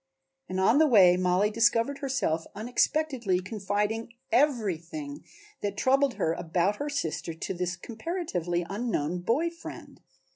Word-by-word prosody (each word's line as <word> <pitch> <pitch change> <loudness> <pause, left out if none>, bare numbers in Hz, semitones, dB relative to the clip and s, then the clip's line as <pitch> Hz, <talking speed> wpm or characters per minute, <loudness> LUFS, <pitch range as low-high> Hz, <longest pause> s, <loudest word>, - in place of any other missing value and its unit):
And 185 0 -2
on 225 +9 +4
the 315 - +6
way 190 -9 +7
Mollie 185 +3 +2
discovered 230 +4 +2
herself 260 - -1
unexpectedly 245 -2 0
confiding 210 +3 -2 0.2
everything 265 - 0 0.4
that 200 -1 -3
troubled 270 +1 +3
her 160 - 0
about 175 +4 0
her 290 - -3
sister 165 - -3
to 165 - -4
this 180 0 -2
comparatively 185 - -3
unknown 190 -6 -2
boy 260 - +1
friend. 335 - -10
210 Hz, 125 wpm, -28 LUFS, 180-270 Hz, 0.4 s, way